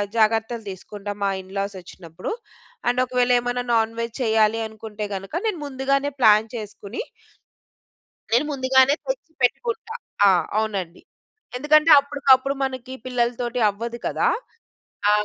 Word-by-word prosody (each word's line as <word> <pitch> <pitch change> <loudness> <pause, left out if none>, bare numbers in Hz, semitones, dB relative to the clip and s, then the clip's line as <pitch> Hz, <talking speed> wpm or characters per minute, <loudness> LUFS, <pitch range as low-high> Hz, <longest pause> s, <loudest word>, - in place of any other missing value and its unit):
జాగ్రత్తలు 225 +1 +1
తీసుకుంటా 205 +2 -7
మా 200 - +2
ఇన్‌లాస్ 195 +1 -4
వచ్చినప్పుడు. 175 -1 -8 0.6
అండ్ 245 +1 +2
ఒకవేళ 250 0 +1
ఏమైనా 245 +1 -2
నాన్ 225 0 +2
వెజ్ 230 -1 -4
చేయాలి 220 -1 +3
అనుకుంటే 215 -1 -7
గనుక 195 +4 -8
నేను 420 -5 -1
ముందుగానే 275 +1 0
ప్లాన్ 215 -2 +5
చేసుకొని 210 0 -6 1.3
నేను 240 +6 +3
ముందుగానే 265 0 +4
తెచ్చి - - -4
పెట్టుకుంటా. 450 - 0 0.3
ఆ! - - +7 0.3
అవునండి. 195 -6 -2 0.6
ఎందుకంటే 305 +4 +4
అప్పటికప్పుడు 275 -1 +3
మనకి 260 -1 -4
పిల్లలతోటి 245 0 -1
అవ్వదు 230 +4 -5
కదా! - - +1 0.8
ఆ! - - +6
235 Hz, 120 wpm, -23 LUFS, 215-265 Hz, 1.3 s, ఆ